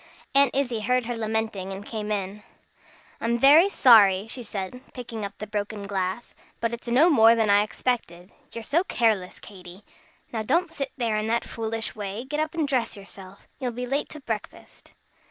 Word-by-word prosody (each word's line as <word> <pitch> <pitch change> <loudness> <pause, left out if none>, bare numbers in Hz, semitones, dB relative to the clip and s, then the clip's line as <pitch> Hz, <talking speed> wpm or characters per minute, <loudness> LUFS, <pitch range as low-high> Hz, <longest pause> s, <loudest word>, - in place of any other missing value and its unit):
Aunt 275 -2 +4
Izzie 250 -5 0
heard 250 +3 +1
her 240 +1 -3
lamenting, 220 -3 -2
and 195 +1 -7
came 215 -2 -5
in. 200 0 -3 0.8
"I'm 235 +1 0
very 295 +9 +7
sorry," 205 - +6
she 235 +3 -4
said, 205 +2 -6
picking 235 -4 -6
up 200 0 -6
the 215 - -6
broken 205 0 -4
glass, 195 +2 -3 0.3
"but 230 0 -1
it's 235 +1 -7
no 255 +8 +5
more 230 -8 +6
than 220 -3 +2
I 205 0 +6
expected, 210 -5 -3 0.2
you're 230 - -7
so 325 +10 +1
careless, 220 - 0
Katy. 185 -1 -12 0.5
Now 225 - -1
don't 330 +9 0
sit 275 -4 -4
there 230 -4 0
in 215 +1 -2
that 235 +1 0
foolish 225 0 -3
way! 205 +2 -5
Get 295 +3 -3
up 310 +2 -2
and 315 -3 0
dress 250 -6 -1
yourself. 195 -1 -13
You'll 250 -3 -3
be 250 +2 -4
late 275 +4 -2
to 305 - -9
breakfast." 225 -5 -7
225 Hz, 185 wpm, -25 LUFS, 205-250 Hz, 0.8 s, very